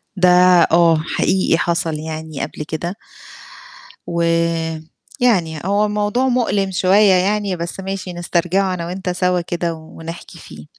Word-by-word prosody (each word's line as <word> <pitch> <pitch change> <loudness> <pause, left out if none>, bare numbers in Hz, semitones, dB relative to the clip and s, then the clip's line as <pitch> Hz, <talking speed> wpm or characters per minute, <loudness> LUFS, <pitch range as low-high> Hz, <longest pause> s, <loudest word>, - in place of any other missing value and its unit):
ده 180 -1 +4 0.4
آه، 165 -1 +5
حقيقي 185 +4 +1
حصل 170 -1 -1
يعني 155 -2 -6
قبل 150 - -5
كده 170 +4 -4 1.1
و 170 0 -2 1.0
يعني 175 - +1
هو 200 +2 +2
الموضوع 210 +5 0
مؤلِم 215 -6 0
شوية 190 +2 +4
يعني، 200 +1 +1
بس 170 +2 -6
ماشي 195 -1 -5
نسترجعه 175 +2 0
أنا 170 -2 -4
وأنت 180 +2 -5
سوا 180 0 0
كده 170 0 -3
و 160 -1 -13
ونحكي 165 +1 -9
فيه. - - -12
180 Hz, 135 wpm, -18 LUFS, 170-195 Hz, 1.1 s, آه